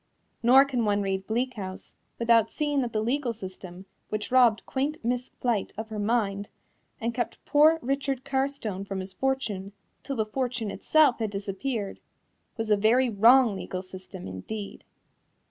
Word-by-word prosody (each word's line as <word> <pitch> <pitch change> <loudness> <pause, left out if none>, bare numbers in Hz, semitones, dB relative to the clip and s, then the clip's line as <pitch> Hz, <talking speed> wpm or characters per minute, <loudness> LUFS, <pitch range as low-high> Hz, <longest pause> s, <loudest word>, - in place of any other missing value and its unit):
Nor 260 +4 +7
can 255 -4 -1
one 205 -1 +1
read 190 -1 -2
Bleak 245 +3 0
House 190 -4 -7 0.2
without 230 -1 +4
seeing 290 -2 0
that 240 -2 -2
the 215 0 -1
legal 250 +1 0
system 185 -3 -9 0.2
which 215 +2 -3
robbed 240 -4 +4
quaint 280 +3 -1
Miss 245 +1 -1
Flite 235 -5 0
of 220 +1 -5
her 215 -1 -5
mind 205 -2 0 0.5
and 230 +1 -2
kept 240 0 -4
poor 310 +2 +5
Richard 270 0 -1
Carstone 265 -8 -2
from 195 -1 -4
his 190 0 -7
fortune 215 -8 -2 0.3
till 275 - -4
the 220 -3 0
fortune 240 -2 -2
itself 305 -6 +3
had 220 -2 -1
disappeared, 200 +2 -4 0.6
was 225 -1 -2
a 210 - +5
very 235 +4 +3
wrong 230 +2 +6
legal 185 -1 -5
system 185 - -10
indeed. 195 - -7
225 Hz, 160 wpm, -27 LUFS, 200-260 Hz, 0.6 s, Nor